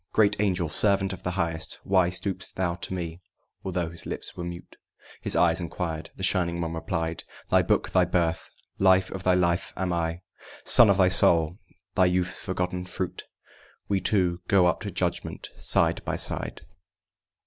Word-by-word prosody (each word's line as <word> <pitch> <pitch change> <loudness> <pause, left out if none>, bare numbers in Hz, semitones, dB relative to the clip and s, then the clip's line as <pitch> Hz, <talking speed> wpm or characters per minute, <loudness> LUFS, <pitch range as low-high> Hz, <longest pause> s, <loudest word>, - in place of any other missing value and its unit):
"Great 105 -1 +4
Angel, 90 -4 +1
servant 95 +4 +1
of 95 - -9
the 90 - -3
Highest, 80 -2 -2
why 95 -2 +3
Stoop'st 95 0 -3
thou 90 -2 0
to 85 - -6
me?" 85 -2 -5 0.4
although 90 -3 -2
his 85 - -2
lips - - -5
were 90 - -6
mute, 85 0 -8 0.5
His - - 0
eyes 85 0 +3
inquired. 80 -2 -4
The 95 - -8
Shining 85 -2 +2
One 85 -1 -3
replied: 80 0 -3 0.3
"Thy - - +5
Book, - - 0
thy - - +4
birth, 85 -2 -1 0.3
life 95 0 +4
of 95 - -5
thy 90 0 +3
life 85 -1 +1
am 90 -2 -1
I, 85 0 -2 0.4
Son 120 -3 +7
of 100 - +4
thy 95 -2 +5
soul, 85 -1 +4 0.3
thy 90 - +4
youth's 90 0 0
forgotten 90 -1 -3
fruit. 90 0 -5 0.6
We 100 -1 +1
two 90 -2 +1
go 95 -2 +4
up 90 - +1
to 105 - -4
judgment 90 -2 -3
side - - +2
by - - -2
side." - - 0
90 Hz, 170 wpm, -26 LUFS, 85-95 Hz, 0.6 s, Son